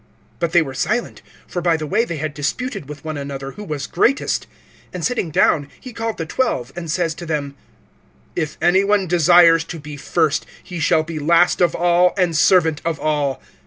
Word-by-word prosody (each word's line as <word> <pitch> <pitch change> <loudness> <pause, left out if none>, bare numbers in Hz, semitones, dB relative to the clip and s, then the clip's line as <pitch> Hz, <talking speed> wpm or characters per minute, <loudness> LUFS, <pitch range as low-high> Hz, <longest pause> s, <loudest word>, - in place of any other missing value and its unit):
(34)But 170 -1 -1
they 170 -1 +4
were 135 -3 -7
silent; 225 - -2 0.2
for 175 - -4
by 170 -2 +2
the 155 - -4
way 210 +9 +1
they 170 -7 -5
had 155 0 -3
disputed 150 - -3
with 150 0 -9
one 155 -1 -4
another, 135 -1 -6
who 210 - -9
was 150 -7 -4
greatest. 250 +10 0 0.5
(35)And 180 - -5
sitting 235 -6 -1
down, 145 -1 +2
he 255 - -10
called 225 -1 -3
the 165 - -3
twelve, 140 - -1
and 170 -2 -6
says 165 0 0
to 170 - -9
them: 145 -3 -2 0.8
If 160 -3 -3
any 190 +3 +4
one 200 -1 +2
desires 170 -1 +5
to 165 0 -7
be 150 -1 -9
first, 155 +2 0 0.2
he 175 -2 -7
shall 160 -1 +3
be 160 -1 -6
last 170 +5 +3
of 175 - +3
all, 175 +1 +3
and 180 -3 +1
servant 160 -2 +3
of 165 -2 -2
all. 145 -3 -1
165 Hz, 200 wpm, -20 LUFS, 150-180 Hz, 0.8 s, desires